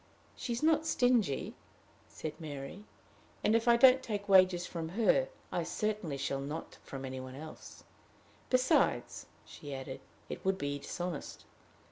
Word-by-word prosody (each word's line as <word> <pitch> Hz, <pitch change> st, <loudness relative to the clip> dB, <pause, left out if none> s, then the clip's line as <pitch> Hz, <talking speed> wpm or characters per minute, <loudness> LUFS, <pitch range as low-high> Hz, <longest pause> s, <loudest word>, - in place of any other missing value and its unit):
"She 245 Hz, -, -5 dB
is 235 Hz, -, -3 dB
not 320 Hz, 0 st, +3 dB
stingy," 240 Hz, -, +2 dB, 0.5 s
said 155 Hz, -, -6 dB
Mary; 150 Hz, +5 st, -7 dB, 0.6 s
"and, 215 Hz, -, +4 dB
if 230 Hz, +1 st, +1 dB
I 235 Hz, 0 st, +7 dB
don't 260 Hz, +1 st, +7 dB
take 205 Hz, -4 st, -4 dB
wages 185 Hz, -2 st, +5 dB
from 165 Hz, -3 st, -5 dB
her, -, -, +4 dB, 0.2 s
I -, -, 0 dB
certainly 210 Hz, -9 st, -2 dB
shall 135 Hz, 0 st, -2 dB
not 150 Hz, +4 st, -6 dB
from 135 Hz, -1 st, -7 dB
any 130 Hz, 0 st, -5 dB
one 130 Hz, 0 st, -8 dB
else. 155 Hz, +3 st, -10 dB, 0.7 s
Besides," 255 Hz, 0 st, +2 dB, 0.2 s
she 145 Hz, -2 st, -8 dB
added, 135 Hz, 0 st, -7 dB, 0.3 s
"it -, -, -7 dB
would 190 Hz, 0 st, +1 dB
be 145 Hz, -2 st, -2 dB
dishonest." 175 Hz, +1 st, -5 dB
180 Hz, 145 wpm, -33 LUFS, 140-230 Hz, 0.7 s, I